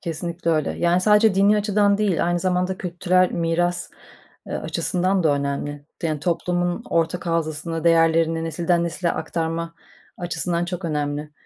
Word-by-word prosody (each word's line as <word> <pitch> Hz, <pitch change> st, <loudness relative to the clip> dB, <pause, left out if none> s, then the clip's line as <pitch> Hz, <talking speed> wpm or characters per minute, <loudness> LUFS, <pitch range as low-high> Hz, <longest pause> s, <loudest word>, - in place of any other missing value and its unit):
Kesinlikle 170 Hz, 0 st, -3 dB
öyle. 155 Hz, -2 st, +1 dB
Yani, 175 Hz, +1 st, +2 dB
sadece 210 Hz, +1 st, +4 dB
dini 200 Hz, +2 st, +4 dB
açıdan 205 Hz, -1 st, +2 dB
değil 190 Hz, -6 st, +1 dB
aynı 175 Hz, 0 st, +1 dB
zamanda 180 Hz, +1 st, 0 dB
kültürel 180 Hz, +1 st, +1 dB
miras, 175 Hz, +1 st, 0 dB, 0.6 s
eee, -, -, -7 dB
açısından 185 Hz, +1 st, 0 dB
da 160 Hz, -, +3 dB
önemli. 140 Hz, +1 st, -3 dB, 0.2 s
Yani, 155 Hz, -3 st, -1 dB
toplumun 175 Hz, 0 st, -1 dB
ortak 170 Hz, +2 st, 0 dB
hafızasını, 165 Hz, 0 st, -2 dB
değerlerini 165 Hz, 0 st, +3 dB
nesilden 170 Hz, +2 st, 0 dB
nesile 170 Hz, +1 st, -1 dB
aktarma 165 Hz, +1 st, -3 dB, 0.4 s
açısından 170 Hz, 0 st, -2 dB
çok 175 Hz, 0 st, -5 dB
önemli. 150 Hz, -1 st, -2 dB
170 Hz, 135 wpm, -22 LUFS, 165-180 Hz, 0.6 s, sadece